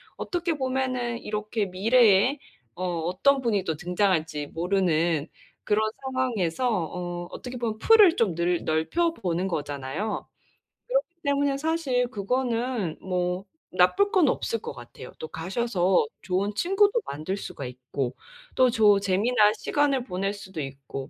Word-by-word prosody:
어떻게 350 -2 -2
보면은 255 -3 -1
이렇게 210 0 -2
미래에 220 +5 +4 0.3
어 180 - -6 0.2
어떤 195 - +2
분이 210 -5 +1
또 160 - -1
등장할지 165 -4 0
모르는 170 -3 +1 0.4
그런 210 +1 +2 0.2
상황에서 255 -6 -1
어 175 -1 -3
어떻게 250 +4 -7
보면 230 -3 -2
풀을 415 - +6
좀 215 - +1
늘 170 +1 0
넓혀 320 - +1
보는 180 - -2
거잖아요. 145 +4 -3 0.6
그렇기 - - +1 0.2
때문에 280 -1 +1
사실 280 -5 0
그거는 235 -3 -1
뭐 180 0 -2 0.3
나쁠 360 - +3
건 360 -6 +4
없을 230 - -1
것 - - -6
같아요. 120 +1 -11
또 160 - -5
가셔서 185 0 +1 0.2
좋은 195 +3 -1
친구도 405 - +3
만들 155 +7 -4
수가 140 - -7
있고 125 +1 -4 0.4
또 255 -1 +5
좋은 210 -3 +5
재미난 210 +3 +3
시간을 280 -1 +1
보낼 195 -3 -2
수도 195 -4 -9
있고 135 -1 -7
205 Hz, 285 characters per minute, -26 LUFS, 175-255 Hz, 0.6 s, 풀을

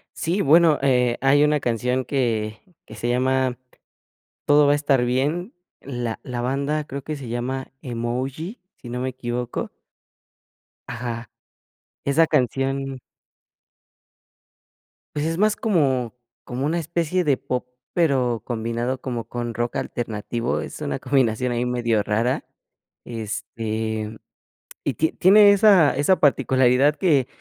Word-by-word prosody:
Sí, 175 +5 -1
bueno, 160 -1 +5
eh, 125 -3 +3
hay 140 +2 +4
una 150 0 +2
canción 125 +2 0
que 110 -6 -1 0.3
que - - -11
se 120 - -3
llama 130 0 +1 0.9
Todo 145 0 +5
va 145 - +4
a - - +5
estar 140 -4 +2
bien, 145 - -1 0.3
la 120 -4 -4
la 125 -2 -4
banda 140 +4 -1
creo 140 0 -6
que 155 +3 -5
se 135 -4 -8
llama 130 +3 -4
Emoji, 130 - -4 0.2
si 120 - -12
no 125 +1 -4
me 130 - -1
equivoco. 120 -1 -4 1.2
Ajá. 115 -1 -5 0.8
Esa 150 +4 +4
canción 135 -1 -1 2.2
Pues, 145 - 0
es 165 +1 -2
más 210 +1 +3
como 135 - +1 0.3
como 125 +2 -4
una 160 +4 0
especie 170 +2 -1
de 145 -4 +3
pop, 125 -1 -4 0.2
pero 130 - +1
combinado 120 +2 -3
como 120 -3 -3
con 120 -1 -4
rock 120 +2 -3
alternativo, 115 +1 -3
es - - -7
una 145 -2 -2
combinación 125 -2 +1
ahí 120 +1 -1
medio 120 -3 +1
rara. 110 +5 0 0.6
Este, 110 -1 -4 0.7
y - - 0
tie 160 - +1
tiene 205 +2 +7
esa 195 - +5
esa 145 +7 +3
particularidad 130 0 +3
que 145 -9 +2
130 Hz, 130 wpm, -23 LUFS, 120-145 Hz, 2.2 s, tiene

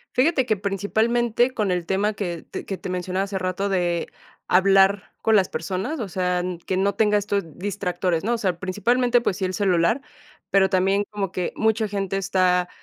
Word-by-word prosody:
Fíjate 265 0 +3
que 215 -4 +1
principalmente 225 +5 +1
con 210 -6 0
el 180 -1 -1
tema 200 +4 0
que 175 -5 -4
te - - -7
que 195 - -4
te - - -7
mencionaba 185 +1 -2
hace 195 -1 -4
rato 185 +2 -2
de 175 -3 0 0.4
hablar 195 +1 +4
con 220 - +3
las 190 -3 +3
personas, 190 - -3
o 220 - -3
sea 180 0 0
n 180 0 -3
que 185 - -1
no 195 +1 +1
tenga 210 0 +3
estos 200 -1 -1
distractores, 180 -3 -2
¿no? 230 +4 0
O - - 0
sea, 185 -6 -1
principalmente, 240 +6 +1
pues 195 -6 -1
sí 195 - -1
el 185 - -2
celular, 185 +5 +2 0.5
pero 190 -1 +4
también 195 +2 +2
como 195 -3 -3
que 180 -2 -3
mucha 220 0 +1
gente 195 -1 -2
está 185 -2 +1
195 Hz, 190 wpm, -23 LUFS, 185-210 Hz, 0.5 s, hablar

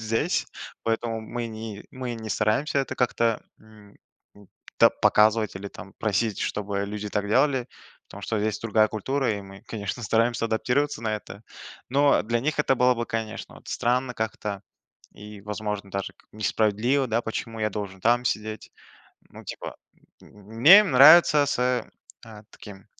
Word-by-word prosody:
здесь. 110 +1 -1 0.4
Поэтому 115 0 -1
мы 120 +2 -5
не 110 -2 -8
мы 130 -2 -5
не 110 -1 -7
стараемся 110 +9 0
это 135 - -4
как-то, 115 -2 0 0.2
м, 105 -2 -18 0.4
м, 100 -2 -18 0.3
та - - +7
показывать 110 -1 +2
или 100 +1 -7
там 95 - -12
просить, 110 -1 0
чтобы 100 -1 -2
люди 105 0 -5
так 105 -1 -2
делали. 130 +2 +2 0.4
Потому 100 - -11
что 110 - -2
здесь 105 0 -1
другая 110 -1 +2
культура, 130 +4 -1
и 100 - -4
мы, 95 0 -13
конечно, 110 +2 -5
стараемся 115 +1 +1
адаптироваться 125 +4 -1
на 110 -1 -1
это. 105 0 -11 0.5
Но 140 +2 +3
для 115 +2 -1
них 155 +5 -2
это 140 -3 +3
было 125 0 +4
бы, 120 0 -3
конечно, 110 -1 -5
вот - - -16
странно 125 +1 0
как-то 105 -3 -4 0.5
и, 105 0 -11
возможно, 105 -1 -5
даже 100 0 -4
как - - -28
несправедливо, 110 +5 +1
да. 115 +1 +1
"Почему 115 0 -5
я 110 - +1
должен 100 -2 -6
там 120 +4 +2
сидеть?" 110 -1 -3 0.6
Ну, - - -12
типа. - - -7 0.5
М, - - -16 0.3
мне 180 - +9
нравится 150 0 +7
с, - - -1
э 125 0 +1 0.4
а, 110 -2 -12
таким, 95 -1 -13
110 Hz, 160 wpm, -25 LUFS, 105-125 Hz, 0.6 s, мне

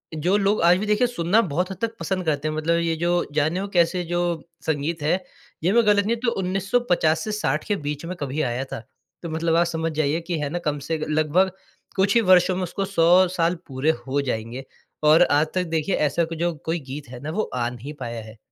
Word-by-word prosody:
जो 175 +6 +1
लोग 200 0 +1
आज 175 +1 +6
भी 210 - -2
देखिए 210 +4 +2
सुनना 215 -1 +2
बहुत 180 0 -1
हद - - -6
तक 230 0 -2
पसंद 185 +2 -2
करते 155 -1 0
हैं। 155 - -2
मतलब 165 +2 +1
ये 165 -1 0
जो, 175 +2 +1
जाने 155 +5 +1
वो 200 - -3
कैसे 180 -1 +2
जो 175 +1 -1 0.5
संगीत 160 +1 -1
है 180 +5 +1 0.4
ये 180 - +3
मैं 235 -2 +4
गलत 205 -1 +4
नहीं 230 +2 +1
हूँ 230 - -12
तो 235 - +3
1950 185 -4 +1
से 215 - -3
60 155 -8 -1
के 205 - +1
बीच 150 -2 -4
में 180 +2 -5
कभी 145 +2 -2
आया 125 0 -1
था। - - -4 0.4
तो 170 - -4
मतलब 165 +1 0
आप 170 0 +4
समझ 165 -1 -2
जाइए 155 +1 0
कि 175 -3 -1
है 145 -1 -2
ना 175 +3 -3
कम 145 -1 0
से 160 -1 0
लगभग 155 +5 +2 0.4
कुछ 200 +3 +2
ही 230 - +6
वर्षों 185 -2 +5
में 185 - -2
उसको 195 +2 -3
100 185 0 +4
साल 170 +2 +2
पूरे 135 +4 +1 0.2
हो 140 +2 +1
जाएँगे 120 0 -4 0.4
और 155 +3 +7
आज 150 +2 +3
तक 185 - +2
देखिए 160 +4 0
ऐसा 165 +4 0
कुछ 165 0 -7
जो 175 0 +1
कोई 165 +1 -1
गीत 140 -3 -7
है 125 - -9
ना 155 - -3
वो 215 +5 -2
आ 120 -1 0
नहीं 125 +5 -8
पाया 115 -1 -4
है। 110 +1 -13
165 Hz, 235 wpm, -23 LUFS, 150-185 Hz, 0.5 s, और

